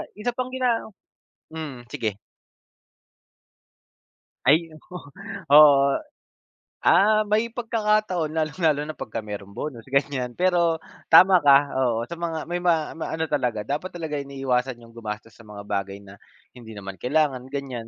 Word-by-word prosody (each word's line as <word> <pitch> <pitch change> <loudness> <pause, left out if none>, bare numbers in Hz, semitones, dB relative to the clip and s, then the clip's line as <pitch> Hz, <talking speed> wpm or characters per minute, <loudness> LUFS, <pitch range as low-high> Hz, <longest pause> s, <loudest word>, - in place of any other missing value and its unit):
isa 215 +4 -2
pang 255 0 -2
gina 250 -3 +1 0.7
mm, 140 -7 -7
sige. 110 -2 -3 2.3
Ay 160 +4 +4
oo, 170 +3 -11 0.5
oo. 145 -2 +8 1.0
Ah, 215 +2 +5
may 220 +3 +1
pagkakataon, 215 -8 0
lalong-lalo 155 -1 +1
na 155 - -6
pagka 110 0 -5
meron 100 -1 -7
bonus, 125 -7 -6
ganiyan. 140 -3 0
Pero, 175 -3 +2 0.3
tama 185 +3 +8
ka, 140 0 +5
oo, 120 -3 +1
sa 170 - -6
mga 165 -2 -3
may 175 +1 -2
ma 165 -3 +1
maano 160 0 -3
talaga, 125 -8 -1
dapat 150 +7 -3
talaga 160 -3 -4
iniiwasan 135 -2 -2
'yong 115 -1 -17
gumastos 110 0 -7
sa 115 - -16
mga 105 -1 -9
bagay 100 0 -3
na, 100 0 -13 0.4
hindi 115 -3 -12
naman 95 -1 -7
kailangan, 135 -1 0
ganiyan. 130 -5 -5
145 Hz, 135 wpm, -24 LUFS, 120-170 Hz, 2.3 s, oo